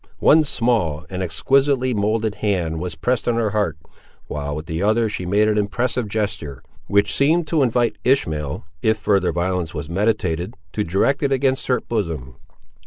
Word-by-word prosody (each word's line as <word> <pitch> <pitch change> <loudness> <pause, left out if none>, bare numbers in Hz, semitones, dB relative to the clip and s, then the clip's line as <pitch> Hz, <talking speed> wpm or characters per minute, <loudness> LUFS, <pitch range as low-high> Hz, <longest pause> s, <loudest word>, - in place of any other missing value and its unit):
One 155 +1 +5
small 110 - 0
and 95 0 -3
exquisitely 130 - +2
moulded 110 +1 0
hand 90 -6 0
was 90 -1 -4
pressed 125 -1 -1
on 120 - +2
her 115 -3 0
heart, 100 -7 0 0.5
while 75 0 -4
with 75 +1 -6
the 80 +1 -3
other 110 +3 +2
she 90 -4 -4
made 105 +3 +3
an 105 0 +2
impressive 120 +3 -1
gesture, 100 - -3 0.2
which 100 0 +2
seemed 160 +5 +3
to 160 -3 +2
invite 120 -2 +1
Ishmael, 80 - 0 0.2
if 110 0 +2
further 100 -4 +1
violence 90 -1 -2
was 80 - -5
meditated, 95 -1 0 0.2
to 105 - 0
direct 100 +10 +1
it 140 -2 +1
against 135 0 +1
her 125 - +2
bosom. 80 - -3
105 Hz, 170 wpm, -21 LUFS, 85-120 Hz, 0.5 s, One